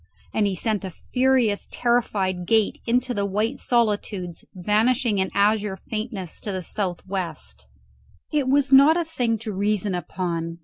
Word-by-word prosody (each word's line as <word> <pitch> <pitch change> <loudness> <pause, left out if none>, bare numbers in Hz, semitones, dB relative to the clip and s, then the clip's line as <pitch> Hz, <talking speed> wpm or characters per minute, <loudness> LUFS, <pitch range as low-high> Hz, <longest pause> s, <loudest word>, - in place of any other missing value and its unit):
And 210 -2 +2
he 195 - -1
sent 210 +3 -1
a 190 - -4
furious 250 +1 +1
terrified 195 -7 0
gaze 220 -1 +2
into 250 +2 +1
the 205 -3 -1
white 210 +6 -1
solitudes 205 -7 -1
vanishing 215 +4 +2
in 190 - +1
azure 205 -1 +2
faintness 215 -4 -5
in 205 - -4
the 185 - -4
south 185 -2 -3
west. 160 - -5 0.6
It 290 -3 +1
was 275 0 +2
not 285 +5 +7
a 340 - 0
thing 245 -8 0
to 215 -1 -5
reason 205 0 0
upon. 170 -2 -3
210 Hz, 150 wpm, -24 LUFS, 190-240 Hz, 0.6 s, not